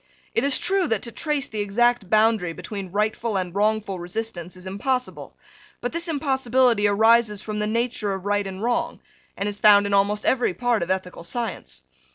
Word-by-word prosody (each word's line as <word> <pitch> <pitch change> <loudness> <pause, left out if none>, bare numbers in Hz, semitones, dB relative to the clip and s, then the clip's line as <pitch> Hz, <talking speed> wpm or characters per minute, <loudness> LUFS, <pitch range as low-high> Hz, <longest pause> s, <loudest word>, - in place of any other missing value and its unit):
It - - +1
is 280 -1 +3
true 380 -1 +1
that 225 -6 -1
to 235 - -5
trace 295 +1 -1
the 215 - -6
exact 215 0 +1
boundary 215 -5 +3
between 195 0 -7
rightful 215 +1 -1
and 180 -2 -3
wrongful 205 -1 0
resistance 180 -1 -5
is 180 - -12
impossible: 250 +7 -3 0.4
but 245 - -3
this 335 +1 -1
impossibility 260 -7 +2
arises 220 0 +3
from 215 -1 -4
the 210 - 0
nature 230 -2 -1
of 190 0 -8
right 205 -1 0
and 190 +2 -6
wrong, 240 0 -1 0.4
and 200 - -2
is 205 0 -5
found 205 -1 +6
in 200 - -2
almost 205 +1 +2
every 245 -8 +1
part 245 -3 +1
of 170 - -3
ethical 185 -2 -3
science. 170 - -4
215 Hz, 185 wpm, -23 LUFS, 195-240 Hz, 0.4 s, found